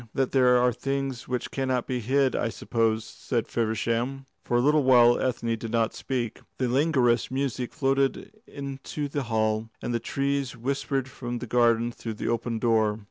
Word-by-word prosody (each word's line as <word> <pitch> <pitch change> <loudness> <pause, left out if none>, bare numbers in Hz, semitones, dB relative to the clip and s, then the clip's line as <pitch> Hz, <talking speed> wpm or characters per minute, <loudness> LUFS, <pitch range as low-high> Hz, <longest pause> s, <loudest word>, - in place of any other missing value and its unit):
"That 135 -1 +1
there 125 -2 +5
are 125 0 +3
things 135 0 -3
which 125 -1 -3
cannot 130 -2 -1
be 125 -1 -2
hid, 130 +3 +2
I 115 - 0
suppose," 115 -1 0
said 115 +1 -3
Feversham. 115 +4 -1 0.2
For 120 - +1
a - - +4
little 150 +4 +4
while 120 -2 +6
Ethne 115 -2 -1
did 115 0 -6
not 115 0 +1
speak. 120 -4 -3 0.2
The 130 - 0
languorous 125 -3 +2
music 130 -2 -2
floated 135 -2 0 0.2
into 140 +1 -5
the 145 0 -2
hall, 110 0 0
and 120 - -3
the 115 - +1
trees 140 -1 -2
whispered 135 +1 -1
from 120 -1 -5
the 120 - -5
garden 120 0 +3
through 115 -2 -6
the - - -3
open 115 0 -1
door. 110 -2 +2
125 Hz, 175 wpm, -26 LUFS, 115-135 Hz, 0.2 s, while